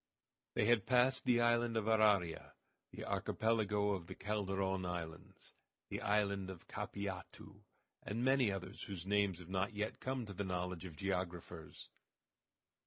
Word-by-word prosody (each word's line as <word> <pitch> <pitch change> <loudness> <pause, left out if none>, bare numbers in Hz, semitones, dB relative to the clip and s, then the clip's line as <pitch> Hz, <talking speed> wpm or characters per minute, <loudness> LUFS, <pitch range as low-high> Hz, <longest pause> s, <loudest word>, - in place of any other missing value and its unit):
They - - +3
had 115 -3 +4
passed 130 +1 +4
the 120 -1 +4
island 120 -1 +3
of 110 - 0
Araria, 105 -6 +3 0.4
the - - -7
Archipelago 105 -2 +1
of 90 -4 -3
the 95 - -7
Calderon 95 -2 -1
islands, 85 -3 -6 0.4
the - - -3
island 100 -2 +1
of 95 -3 -9
Capiatu, 100 -2 -6 0.4
and 115 +4 -2
many 130 -5 +4
others 95 0 -5
whose 95 -3 -6
names 100 -2 +2
have 90 -1 -11
not 95 +2 0
yet 105 +1 -2
come 130 -2 -2
to 100 - -7
the 100 - -2
knowledge 90 -1 -2
of 80 -4 -8
geographers. 90 -4 -4
100 Hz, 145 wpm, -37 LUFS, 90-110 Hz, 0.4 s, had